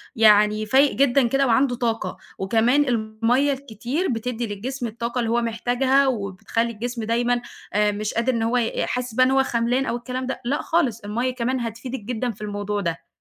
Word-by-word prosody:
يعني 215 Hz, -1 st, +5 dB
فايق 270 Hz, +5 st, +4 dB
جدًا 275 Hz, -2 st, +3 dB
كده 275 Hz, +3 st, +2 dB
وعنده 250 Hz, +2 st, +3 dB
طاقة، 225 Hz, -6 st, -2 dB, 0.2 s
وكمان 230 Hz, +9 st, +3 dB
المَيّة 235 Hz, +4 st, +1 dB
الكتير 265 Hz, -, -3 dB
بتدّي 235 Hz, 0 st, -2 dB
للجسم 240 Hz, +5 st, -4 dB
الطاقة 235 Hz, +2 st, -3 dB
اللي 230 Hz, -2 st, 0 dB
هو 240 Hz, -, +2 dB
محتاجها 245 Hz, +4 st, +2 dB
وبتخلّي 225 Hz, 0 st, -1 dB
الجسم 235 Hz, +1 st, -4 dB
دايمًا 240 Hz, +2 st, +1 dB, 0.3 s
آآ، 210 Hz, 0 st, +3 dB
مش 210 Hz, +1 st, -3 dB
قادر 235 Hz, +3 st, +1 dB
إن 230 Hz, -, -1 dB
هو 230 Hz, +2 st, +1 dB
ي 230 Hz, -2 st, 0 dB
حاسس 250 Hz, -1 st, -3 dB
بقى 255 Hz, +3 st, +4 dB
إن 260 Hz, -, +2 dB
هو 270 Hz, 0 st, +4 dB
خَملان 245 Hz, +2 st, 0 dB
أو 235 Hz, -, -1 dB
الكلام 255 Hz, +2 st, -4 dB
ده، 265 Hz, -, -4 dB
لأ، 280 Hz, +5 st, 0 dB
خالص 270 Hz, -10 st, +1 dB
المَيّة 235 Hz, +4 st, -2 dB
كمان 255 Hz, +1 st, -1 dB
هتفيدِك 235 Hz, +3 st, -5 dB
جدًا 240 Hz, +2 st, -3 dB
في 210 Hz, -, -15 dB
الموضوع 205 Hz, 0 st, -3 dB
ده. 165 Hz, -2 st, -4 dB
235 Hz, 185 wpm, -23 LUFS, 220-255 Hz, 0.3 s, يعني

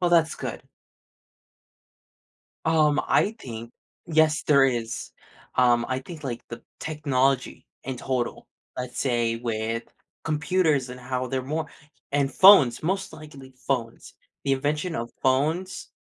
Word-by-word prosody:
Well, 175 Hz, -1 st, +2 dB
that's 165 Hz, -2 st, +4 dB
good. -, -, -6 dB, 2.0 s
Um, 155 Hz, -2 st, +3 dB
I 205 Hz, -, +3 dB
think 115 Hz, -, -8 dB, 0.3 s
yes, 155 Hz, -2 st, +3 dB
there 140 Hz, -2 st, +5 dB
is. 120 Hz, -3 st, -2 dB, 0.5 s
Um, 120 Hz, -2 st, +4 dB
I 130 Hz, 0 st, -1 dB
think 155 Hz, +4 st, -10 dB
like 120 Hz, -3 st, -4 dB
the 120 Hz, 0 st, -8 dB, 0.2 s
technology 140 Hz, -4 st, 0 dB, 0.2 s
in 130 Hz, -2 st, -4 dB
total, 125 Hz, -1 st, -3 dB, 0.3 s
let's 125 Hz, -1 st, -4 dB
say 120 Hz, -3 st, +1 dB
with 115 Hz, 0 st, -3 dB, 0.4 s
computers 155 Hz, -3 st, +1 dB
and 125 Hz, 0 st, -9 dB
how 125 Hz, 0 st, -3 dB
they're 130 Hz, +1 st, -2 dB
more 155 Hz, +5 st, -3 dB, 0.5 s
and 140 Hz, -1 st, +1 dB
phones, 145 Hz, -, +7 dB
most 190 Hz, +4 st, -1 dB
likely 140 Hz, -4 st, -12 dB
phones. 120 Hz, -4 st, -3 dB, 0.3 s
The 140 Hz, -, +2 dB
invention 150 Hz, +5 st, -1 dB
of 120 Hz, -3 st, -4 dB
phones, 155 Hz, +8 st, 0 dB
135 Hz, 125 wpm, -25 LUFS, 125-155 Hz, 2.0 s, phones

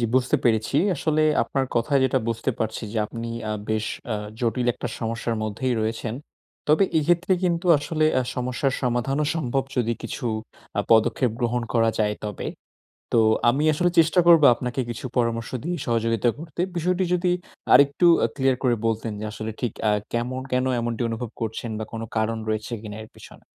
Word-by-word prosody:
জি, -, -, +1 dB
বুঝতে 130 Hz, 0 st, +3 dB
পেরেছি। 110 Hz, +2 st, +2 dB, 0.2 s
আসলে 155 Hz, +1 st, +1 dB, 0.2 s
আপনার 135 Hz, -1 st, -1 dB
কথায় 135 Hz, +4 st, +2 dB
যেটা 130 Hz, 0 st, +2 dB
বুঝতে 115 Hz, +3 st, -1 dB
পারছি 110 Hz, +1 st, -2 dB
যে 115 Hz, -, -1 dB
আপনি 115 Hz, +1 st, -6 dB, 0.2 s
আ -, -, 0 dB, 0.2 s
বেশ 110 Hz, 0 st, 0 dB, 0.3 s
আ -, -, 0 dB, 0.3 s
জটিল 120 Hz, +1 st, 0 dB
একটা -, -, -5 dB
সমস্যার 115 Hz, 0 st, -2 dB
মধ্যেই 120 Hz, +4 st, -1 dB
রয়েছেন। 110 Hz, +1 st, -2 dB, 0.5 s
তবে 155 Hz, +6 st, +5 dB
এক্ষেত্রে 175 Hz, +4 st, +2 dB
কিন্তু 175 Hz, 0 st, 0 dB
আসলে 155 Hz, +1 st, -1 dB, 0.2 s
আ -, -, +1 dB
সমস্যার 125 Hz, +2 st, -1 dB
সমাধানও 125 Hz, +4 st, 0 dB
সম্ভব 135 Hz, -4 st, 0 dB
যদি 115 Hz, -2 st, +1 dB
কিছু -, -, -5 dB, 0.5 s
আ -, -, +5 dB
পদক্ষেপ 115 Hz, +2 st, +4 dB
গ্রহণ 120 Hz, 0 st, 0 dB
করা 115 Hz, -1 st, +4 dB
যায় 105 Hz, -1 st, +1 dB
তবে। 105 Hz, -3 st, -4 dB, 0.7 s
তো 115 Hz, -, +5 dB, 0.3 s
আমি 135 Hz, +5 st, +1 dB
আসলে 175 Hz, +4 st, +2 dB
চেষ্টা 165 Hz, +2 st, +4 dB
করব 170 Hz, -2 st, +8 dB
আপনাকে 125 Hz, +2 st, -3 dB
কিছু 120 Hz, +2 st, -5 dB
পরামর্শ 115 Hz, -1 st, 0 dB
দিয়ে 175 Hz, +2 st, -2 dB
সহযোগিতা 115 Hz, -1 st, +1 dB
করতে। 160 Hz, +1 st, -5 dB
বিষয়টি 180 Hz, +2 st, +1 dB
যদি 180 Hz, 0 st, +2 dB, 0.4 s
আরেকটু 140 Hz, +5 st, +5 dB, 0.2 s
আ -, -, +2 dB
ক্লিয়ার 135 Hz, -2 st, +2 dB
করে 125 Hz, -2 st, +3 dB
বলতেন 115 Hz, 0 st, -1 dB
যে 110 Hz, -, -4 dB
আসলে 110 Hz, +1 st, -5 dB
ঠিক 120 Hz, -4 st, 0 dB, 0.2 s
আ -, -, +4 dB, 0.2 s
কেমন, 125 Hz, +2 st, -2 dB
কেন 125 Hz, 0 st, +1 dB
এমনটি 115 Hz, 0 st, -2 dB
অনুভব 115 Hz, +1 st, -4 dB
করছেন 115 Hz, +1 st, -3 dB
বা, -, -, -2 dB
কোন 115 Hz, -, -5 dB, 0.2 s
কারণ 110 Hz, +1 st, 0 dB
রয়েছে 110 Hz, +2 st, -2 dB
কিনা 105 Hz, -1 st, -7 dB
এর 110 Hz, -, -14 dB
পেছনে? -, -, -14 dB
120 Hz, 175 wpm, -24 LUFS, 115-140 Hz, 0.7 s, করব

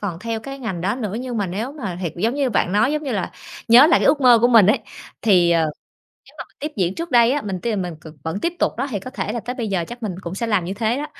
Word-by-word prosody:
còn 185 Hz, -5 st, -4 dB
theo 225 Hz, +3 st, -4 dB
cái 275 Hz, +4 st, -8 dB
ngành 195 Hz, -9 st, -4 dB
đó 195 Hz, +5 st, 0 dB
nữa, 210 Hz, -6 st, -4 dB
nhưng 250 Hz, -2 st, -5 dB
mà 200 Hz, -2 st, 0 dB
nếu 215 Hz, +10 st, -4 dB
mà 195 Hz, -, -6 dB
thiệt 170 Hz, -, -2 dB
giống 225 Hz, +8 st, 0 dB
như 275 Hz, -3 st, 0 dB
bạn 190 Hz, -4 st, 0 dB
nói, 215 Hz, +7 st, +3 dB
giống 305 Hz, 0 st, -2 dB
như 270 Hz, -5 st, -3 dB
là, 200 Hz, -, -2 dB, 0.4 s
nhớ 245 Hz, +6 st, +8 dB
lại 330 Hz, -, +4 dB
cái -, -, +2 dB
ước 285 Hz, 0 st, +3 dB
mơ 245 Hz, -3 st, +7 dB
của 240 Hz, -, +4 dB
mình 225 Hz, -6 st, +6 dB
ấy, 210 Hz, -, +4 dB, 0.4 s
thì, 180 Hz, -6 st, +4 dB
ờ, 170 Hz, -1 st, +3 dB, 0.7 s
nếu -, -, -19 dB
mà -, -, -5 dB
mình -, -, -34 dB
tiếp 300 Hz, +1 st, -4 dB
diễn 185 Hz, -2 st, 0 dB
trước 335 Hz, -1 st, -5 dB
đây 240 Hz, 0 st, +5 dB
á, 290 Hz, -, -1 dB
mình 190 Hz, -4 st, -4 dB
tin 235 Hz, -, -2 dB
là 215 Hz, -, -1 dB
mình 165 Hz, -, -8 dB
c 155 Hz, -3 st, -14 dB
vẫn 160 Hz, +5 st, -3 dB
tiếp 340 Hz, -, -1 dB
tục -, -, 0 dB
đó 270 Hz, +4 st, -1 dB
thì 205 Hz, -5 st, -3 dB
có 255 Hz, -, -8 dB
thể 220 Hz, -5 st, -4 dB
là 235 Hz, -, -3 dB
tới 245 Hz, +3 st, -5 dB
bây 235 Hz, -4 st, -3 dB
giờ 185 Hz, -4 st, -1 dB
chắc 240 Hz, 0 st, -9 dB
mình 205 Hz, -5 st, -3 dB
cũng 170 Hz, +1 st, -6 dB
sẽ 230 Hz, +4 st, -3 dB
làm 210 Hz, -5 st, +1 dB
như 190 Hz, +3 st, -4 dB
thế 225 Hz, +3 st, 0 dB
đó. 295 Hz, +2 st, -3 dB
220 Hz, 320 wpm, -21 LUFS, 190-255 Hz, 0.7 s, nhớ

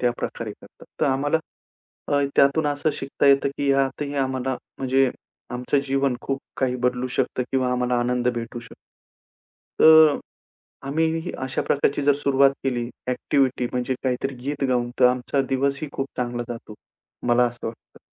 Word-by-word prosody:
त्या 125 Hz, -, +3 dB
प्रकारे 115 Hz, -2 st, -4 dB
करतात. -, -, -17 dB, 0.2 s
तर -, -, +3 dB
आम्हाला 145 Hz, +4 st, +1 dB, 0.7 s
अ, 145 Hz, -, +2 dB, 0.2 s
त्यातून 140 Hz, +3 st, +4 dB
असं 145 Hz, +1 st, 0 dB
शिकता 140 Hz, 0 st, -1 dB
येतं, 140 Hz, 0 st, +5 dB
की 140 Hz, -1 st, +1 dB
ह्यातही 135 Hz, +1 st, 0 dB
आम्हाला 130 Hz, -2 st, -1 dB, 0.2 s
म्हणजे 135 Hz, 0 st, +2 dB, 0.4 s
आमचं 125 Hz, +3 st, 0 dB
जीवन 135 Hz, -1 st, +1 dB
खूप 135 Hz, 0 st, -2 dB, 0.2 s
काही 130 Hz, -1 st, 0 dB
बदलू 125 Hz, 0 st, 0 dB
शकतं 130 Hz, -1 st, 0 dB
किंवा 130 Hz, -1 st, +1 dB
आम्हाला 125 Hz, 0 st, +1 dB
आनंद 125 Hz, 0 st, 0 dB
भेटू 115 Hz, +1 st, -5 dB
शकतो. 115 Hz, -, -13 dB, 1.1 s
तर 160 Hz, -2 st, +8 dB, 0.7 s
आम्ही 160 Hz, +3 st, 0 dB, 0.2 s
अशा 130 Hz, -, -2 dB
प्रकारची 145 Hz, 0 st, +1 dB
जर 145 Hz, 0 st, +4 dB
सुरुवात 140 Hz, -1 st, +4 dB
केली 120 Hz, -3 st, -1 dB, 0.2 s
एक्टिव्हिटी 130 Hz, -1 st, +1 dB
म्हणजे 125 Hz, +1 st, -1 dB
काहीतरी 130 Hz, +1 st, -1 dB
गीत 140 Hz, +1 st, -2 dB
गाऊन 120 Hz, -1 st, +1 dB
तर 125 Hz, -, +8 dB
आमचा 125 Hz, +2 st, +1 dB
दिवसही 140 Hz, +3 st, 0 dB
खूप 135 Hz, -, -2 dB
चांगला 120 Hz, -1 st, -2 dB
जातो. 115 Hz, -2 st, -10 dB, 0.5 s
मला 120 Hz, +1 st, +5 dB
असं 120 Hz, 0 st, -6 dB
वाटतं. 115 Hz, 0 st, -10 dB
135 Hz, 150 wpm, -23 LUFS, 125-140 Hz, 1.1 s, तर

